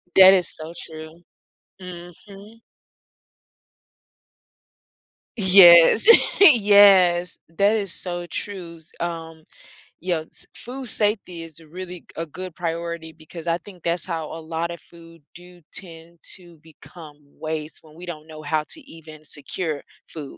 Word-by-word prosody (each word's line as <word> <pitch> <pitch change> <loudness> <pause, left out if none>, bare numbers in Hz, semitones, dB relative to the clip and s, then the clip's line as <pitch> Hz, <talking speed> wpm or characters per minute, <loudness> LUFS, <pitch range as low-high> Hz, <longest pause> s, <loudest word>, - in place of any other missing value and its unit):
That 190 0 +9
is 180 -3 +2
so 160 +2 -9
true. 160 +1 -12 0.6
Mhm. 195 +5 -12 2.8
Yes, 185 - +7 0.5
yes. 195 -4 +4
That 200 +6 +1
is 200 -4 -3
so 175 -1 -5
true. 175 -4 -7 0.2
Um, 165 -2 -6 0.6
yes, 170 -3 -5
food 260 +2 -9
safety 205 -5 0
is 165 -1 -10
a 160 - -18
really 180 +1 -8
g - - -34
a 165 - -3
good 185 +3 -8
priority 170 -1 -5
because 160 +1 -12
I 170 0 +1
think 180 -1 -16
that's 170 +1 -2
how 165 -3 -4
a 165 - -7
lot 165 +1 -4
of 170 -1 -8
food 165 -2 -18
do 180 0 -14
tend 170 -2 -10 0.2
to 175 -3 -17
become 160 -1 -15 0.2
waste, 155 -1 -6
when 155 -1 -19
we 175 - -10
don't 155 -3 -9
know 155 -1 -11
how 155 +1 -1
to 320 - -9
even 155 - -14
secure 150 +1 -5 0.3
food. 150 -4 -10
170 Hz, 135 wpm, -22 LUFS, 160-185 Hz, 2.8 s, That